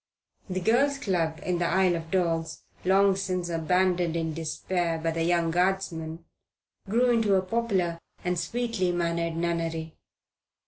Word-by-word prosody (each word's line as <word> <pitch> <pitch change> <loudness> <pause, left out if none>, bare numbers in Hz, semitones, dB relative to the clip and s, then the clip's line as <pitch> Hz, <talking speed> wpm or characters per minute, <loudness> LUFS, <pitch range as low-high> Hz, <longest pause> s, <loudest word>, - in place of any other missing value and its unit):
The 185 0 -1
Girls' 270 +8 +3
Club 170 - -1
in 180 -1 -1
the 175 - +1
Isle 185 0 +3
of 165 0 -8
Dogs, 165 -3 -1 0.2
long 195 +1 +4
since 185 -2 -2
abandoned 175 +1 +1
in 165 -1 -1
despair 165 +2 -2
by 165 +1 -1
the 165 0 -1
young 170 -1 +2
Guardsman, 175 -3 -1 0.6
grew 245 +4 +3
into 220 -4 +3
a 190 - +2
popular 190 -5 0 0.3
and 180 -1 0
sweetly 230 -2 -1
mannered 170 -1 -1
nunnery. 165 -1 -2
175 Hz, 140 wpm, -27 LUFS, 165-190 Hz, 0.6 s, long